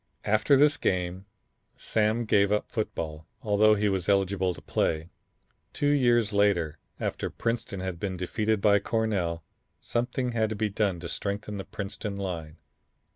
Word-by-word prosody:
After 110 +7 +4
this 150 +2 +5
game 90 +1 -1 0.5
Sam 110 +2 +1
gave 100 -2 +3
up 105 - 0
football, 80 -8 -4 0.2
although 105 0 +4
he 105 0 +1
was 95 -2 -1
eligible 95 -2 +2
to - - -10
play. 80 +2 -1 0.6
Two 145 0 +1
years 120 -6 +3
later, 95 -7 +2 0.2
after - - -2
Princeton 115 -5 -3
had 95 -2 -4
been 95 -1 -3
defeated 105 +4 0
by 100 0 +5
Cornell, 100 -7 -1 0.4
something 125 +1 -1
had 110 -2 +1
to 110 - -3
be 105 +1 0
done 100 -3 0
to 85 - -5
strengthen 100 +3 -4
the 95 - -5
Princeton 100 0 -5
line. 85 -6 -5
100 Hz, 150 wpm, -28 LUFS, 95-110 Hz, 0.6 s, this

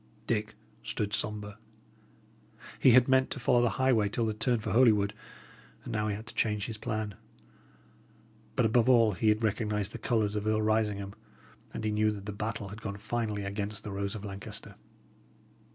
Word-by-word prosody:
Dick 110 -1 -1 0.3
stood 105 -1 -3
sombre. 105 0 -2 1.2
He 130 - +6
had 125 0 +7
meant 130 0 +4
to - - -5
follow 120 -1 +3
the 120 - +3
highway 125 -6 +3
till 115 +3 -1
the 110 - 0
turn 115 +3 +1
for 110 -1 -4
Holywood, 105 -4 +4 0.7
and - - -6
now 105 0 0
he 105 - -1
had 110 +2 -8
to 120 - -11
change 105 -2 0
his 110 -2 -6
plan. 110 -1 -3 1.4
But - - +3
above 115 +2 +3
all, 115 -3 +6
he 105 +3 +1
had 105 +2 +2
recognised 105 -2 0
the 120 - -7
colours 110 -4 +1
of 105 0 -2
Earl 110 0 +2
Risingham, 105 -2 0 0.6
and - - -5
he 110 - 0
knew 110 0 +2
that 100 -1 -8
the 105 - -4
battle 105 -1 -4
had 105 +3 -9
gone 100 -1 -5
finally 110 -1 -2
against 100 +2 -4
the 105 - -6
rose 100 +1 -3
of 105 0 -6
Lancaster. 100 -1 -6
110 Hz, 185 wpm, -30 LUFS, 105-115 Hz, 1.4 s, had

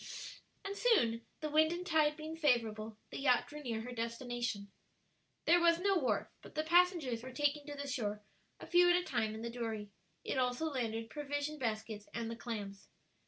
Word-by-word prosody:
And 395 0 -3
soon, 235 - +3
the 305 - -2
wind 315 +1 +5
and 350 +1 -3
tide 310 -3 +3
being 315 +1 -5
favorable, 225 -8 +1
the - - -5
yacht 255 -3 +4
drew 300 0 -8
near 230 -5 -2
her 245 +2 -6
destination. 235 -3 -3 0.7
There 345 +2 +6
was 340 -1 +5
no 395 +1 +3
wharf, 295 -8 +1
but - - -13
the 310 - +1
passengers 335 -8 +3
were 260 +2 -7
taken 290 +2 0
to 290 - -5
the 285 0 -4
shore, 210 -6 -2 0.4
a - - -8
few 355 0 +5
at 350 - +6
a 355 - +2
time, 220 -10 -1
in 220 - -6
the 235 - -3
dory. 220 -4 -4 0.3
It 265 - -1
also 250 +4 +1
landed 225 -4 -2
provision 290 +1 -3
baskets 220 -3 -3
and 230 -1 -2
the - - -4
clams. 205 -4 -6
255 Hz, 190 wpm, -35 LUFS, 225-310 Hz, 0.7 s, There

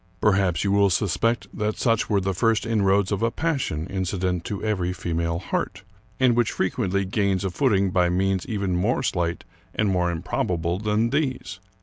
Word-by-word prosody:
Perhaps 95 -4 +2
you 100 - +1
will 100 0 +4
suspect 100 +3 0
that 105 0 -1
such 115 -2 +1
were 105 -2 +3
the 95 0 -1
first 115 +4 +1
inroads 100 -3 +2
of 100 0 -1
a 115 - +2
passion 135 - -2
inci 95 +1 -3
dent 90 -2 -1
to 100 - -4
every 95 -5 0
female 85 -1 -2
heart, 95 +1 -3 0.4
and 125 -2 +4
which 120 -2 +1
frequently 100 -1 0
gains 100 -1 0
a 95 - -1
footing 100 -5 +2
by 90 -1 +3
means 95 +1 +1
even 100 -5 -1
more 105 +9 +1
slight 85 -7 -1 0.3
and 105 -2 +1
more 90 -2 +1
improbable 85 +1 -1
than 105 +2 +1
these. 130 - -2
100 Hz, 180 wpm, -24 LUFS, 90-110 Hz, 0.4 s, will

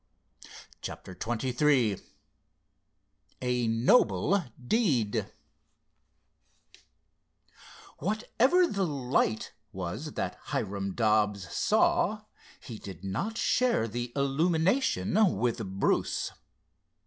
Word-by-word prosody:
CHAPTER 95 - -7
XXIII 120 0 +1 1.4
A 125 -2 0
NOBLE 115 - +3 0.2
DEED 135 - +1 2.7
Whatever 245 - +2
the 200 - -1
"light" 125 -6 0 0.2
was 105 - -5
that - - -4
Hiram 100 -1 -3
Dobbs 105 -4 +1
saw, - - +2 0.4
he 110 - -9
did 95 -2 -10
not 155 - -3
share 245 - +2
the 120 +2 -4
illumination 165 - +2
with 115 +1 0 0.2
Bruce. - - +1
125 Hz, 75 wpm, -29 LUFS, 105-175 Hz, 2.7 s, NOBLE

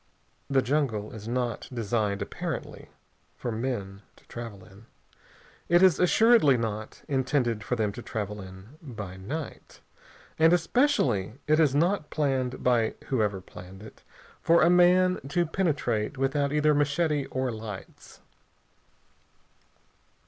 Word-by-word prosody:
The 135 -2 +2
jungle 120 -7 -1
is 110 -1 -9
not 120 0 -2
designed, 105 -4 -1
apparently, - - -6 0.5
for 120 - -4
men 110 -5 -4
to - - -24
travel 115 -5 -8
in. 100 +4 -17 0.8
It 175 +2 +5
is 185 -4 +5
assuredly 180 - +5
not 110 -2 -5
intended 130 -5 0
for 125 - -1
them 110 -3 0
to 120 - -9
travel 105 -2 -5
in 95 +9 -13
by 105 - -8
night, 140 +11 -7 0.6
and 165 +2 +6
especially 165 - +1
it 155 +1 +3
is 145 -4 +3
not 170 +1 +1
planned, 130 -4 -1
by 120 -3 +2
whoever 105 -7 0
planned 95 +2 -12
it, 110 - -13 0.4
for 170 0 +4
a 170 - +5
man 180 +1 +4
to 175 +3 +1
penetrate 145 - -1
without 140 +1 0
either 150 0 +3
machete 145 0 +1
or 130 -1 -2
lights. 110 -3 -9
125 Hz, 125 wpm, -27 LUFS, 110-155 Hz, 0.8 s, and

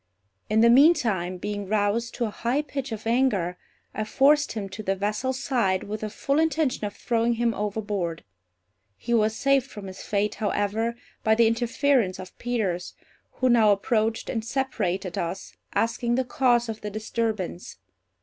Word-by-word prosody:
In 215 +1 +3
the 235 - +6
meantime, 235 - +4
being 205 +1 -4
roused 215 +3 0
to 240 - 0
a 215 - -3
high 245 +7 -1
pitch 275 -3 -5
of 220 -1 -6
anger, 225 -7 +1 0.4
I 215 - -2
forced 290 +6 +3
him 210 -3 -4
to 190 +3 -7
the 195 -2 0
vessel's 210 +7 -2
side, 200 -9 +1
with 210 +1 -5
the 215 - -3
full 275 +7 0
intention 315 -8 +1
of 205 - -5
throwing 235 0 +1
him 235 0 +1
overboard. 205 -5 -3 0.7
He 240 - -3
was 220 -1 +3
saved 275 0 +2
from 205 -4 -9
his 190 0 -8
fate, 210 0 0
however, 215 +2 0 0.3
by 220 -1 +4
the 230 +1 +5
interference 235 -2 +1
of 185 0 -10
Peters, 205 -8 -2 0.4
who 255 - 0
now 225 -3 +5
approached 220 +2 0
and 225 -3 -2
separated 205 -8 -2
us, 170 +3 -5 0.2
asking 235 +1 +1
the 260 +1 0
cause 245 -2 +2
of 220 -1 -5
the 210 - -4
disturbance. 215 -3 -3
220 Hz, 165 wpm, -25 LUFS, 205-245 Hz, 0.7 s, the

